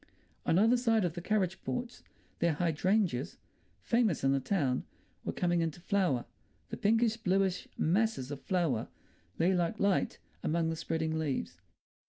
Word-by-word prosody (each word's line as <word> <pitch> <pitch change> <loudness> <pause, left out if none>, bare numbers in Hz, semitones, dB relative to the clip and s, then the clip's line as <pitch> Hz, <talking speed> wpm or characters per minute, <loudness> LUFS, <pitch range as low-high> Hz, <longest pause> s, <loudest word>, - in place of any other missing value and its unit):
On 165 - +4
either 225 +5 +5
side 225 -4 +2
of 170 - -1
the 175 - -6
carriage 190 -2 0
porch 245 0 -4 0.4
their 170 -1 +2
hydrangeas—famous 180 - -1
in 135 - +4
the 135 - +2
town—were 130 -3 -3
coming 175 -1 +1
into 165 0 -2
flower; 175 -9 +1 0.5
the - - -4
pinkish, 225 +1 +2
bluish 190 -3 +1
masses 185 - +1
of 140 -2 -6
flower 165 -11 0 0.5
lay 175 +4 +3
like 175 -2 0
light 200 -1 +1 0.2
among 165 +1 0
the - - -2
spreading 160 0 -2
leaves. 90 - -3
175 Hz, 140 wpm, -32 LUFS, 160-200 Hz, 0.5 s, either